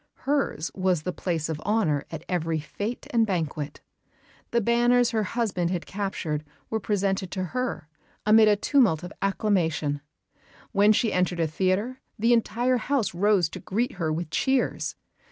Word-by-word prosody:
Hers 270 - 0
was 185 -4 +1
the 180 - -2
place 165 -4 -2
of 160 -2 -3
honour 180 -8 +1
at 160 0 -7
every 165 -2 0
fête 205 +10 -5
and 230 -2 +4
banquet; 155 -7 -2 0.7
the 235 - +2
banners 240 +2 +3
her 220 -2 +1
husband 205 -5 -1
had 180 -2 -2
captured 185 -6 -3 0.3
were 220 - 0
presented 195 -2 0
to 185 -1 -2
her 250 -10 -2 0.4
amid 215 +1 +7
a 210 - +5
tumult 205 - +3
of 180 - -7
acclamation; 165 -8 0 0.7
when 205 0 +5
she 215 +1 +2
entered 180 -1 +1
a 165 - +3
theatre 190 - -1 0.2
the 230 +2 +3
entire 240 +2 +2
house 245 -3 0
rose 195 -1 +3
to - - -8
greet 235 +7 -1
her 160 -1 +1
with 160 0 -3
cheers. 265 -1 0
195 Hz, 155 wpm, -26 LUFS, 170-230 Hz, 0.7 s, amid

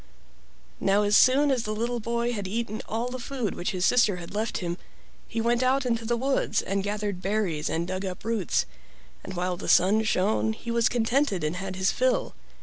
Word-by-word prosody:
Now 200 +1 +3
as 205 0 +3
soon 280 +3 +5
as 255 -3 +1
the 215 -1 -3
little 240 +2 -1
boy 235 +2 -1
had 205 -4 -4
eaten 220 +1 -3
all 230 +3 -1
the 255 +1 -5
food 245 -5 -3
which 175 - -3
his 185 -2 0
sister 235 -6 +4
had 175 0 -9
left 215 +2 -1
him, 175 -1 -4 0.5
he 230 - -4
went 235 +2 +2
out 260 +1 +2
into 230 -2 -1
the 235 +1 0
woods 270 +3 +1
and 195 +1 -1
gathered 205 -2 -3
berries 190 -6 -1
and 170 +1 -1
dug 185 +1 -3
up 185 +1 -6
roots, 220 - 0 0.6
and 190 - -7
while 180 0 -1
the - - -5
sun 200 +5 +5
shone 215 +1 +1
he 235 +1 -6
was 235 0 +3
contented 240 - +1
and 155 +4 -1
had 190 0 -5
his 190 +1 +2
fill. - - 0
215 Hz, 205 wpm, -26 LUFS, 190-240 Hz, 0.6 s, soon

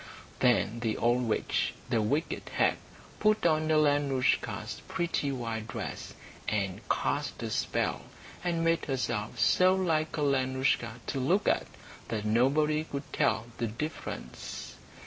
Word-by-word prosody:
Then 120 -2 +3
the 115 -2 -1
old 120 +2 +2
witch, 110 - 0 0.2
the 115 -3 +3
wicked 145 +10 -1
hag, - - +3 0.4
put 215 -2 +3
on 155 -1 +3
Alenoushka's 145 -4 +1
pretty 165 -4 -1
white 115 -4 -3
dress, - - -6 0.3
and 100 -3 -1
cast - - -1
a - - -3
spell, - - 0 0.4
and 170 -2 0
made 165 0 +2
herself 125 -6 -2
so 185 +1 +5
like 160 -4 0
Alenoushka 130 -4 +1
to 135 - -2
look 180 +11 +2
at - - +2 0.4
that 110 -2 -3
nobody 145 +7 +3
could 140 -2 -7
tell 110 - +2
the 115 - 0
difference. 150 +9 -6
135 Hz, 125 wpm, -30 LUFS, 115-155 Hz, 0.4 s, so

